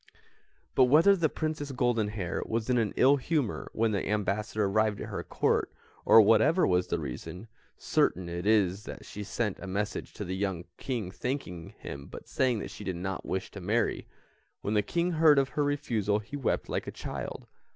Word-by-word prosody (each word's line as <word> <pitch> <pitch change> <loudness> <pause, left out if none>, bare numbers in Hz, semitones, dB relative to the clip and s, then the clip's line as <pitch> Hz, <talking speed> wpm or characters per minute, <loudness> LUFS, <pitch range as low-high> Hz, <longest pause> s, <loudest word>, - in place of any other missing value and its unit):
"] - - -39
But 130 - +6
whether 160 +10 +6
the 165 -4 +1
Princess 155 -2 -3
Goldenhair 110 -7 -1
was 115 +2 -1
in 125 - +3
an 110 -3 0
ill 140 +2 +6
humour 140 -4 -1
when 115 0 +1
the 100 -2 -2
ambassador 105 +1 0
arrived 105 +1 +1
at - - -6
her - - -4
Court, - - 0 0.3
or - - +8
whatever 115 - +4
was 90 -1 +2
the - - 0
reason, 80 - -6 0.3
certain 90 0 +1
it 85 +3 -4
is 100 -2 +2
that - - -8
she 105 - -7
sent 105 0 -2
a 95 - -7
message 100 +3 -3
to 105 - -5
the 95 +1 -3
young 95 -3 -2
King 115 -9 -3
thanking 95 - -5
him 70 0 -8
but - - -10
saying 125 -3 +1
that - - -6
she - - -9
did 95 -3 -3
not 95 +2 -4
wish 95 0 -3
to 100 - -8
marry. 105 +6 0 0.5
When 105 - -2
the 105 - +4
King 170 - -1
heard 155 -3 +5
of 135 -1 +3
her 145 +3 0
refusal 115 -8 0
he 110 +7 -7
wept 140 -4 -1
like - - -3
a - - -3
child. - - -6
110 Hz, 195 wpm, -29 LUFS, 95-130 Hz, 0.5 s, or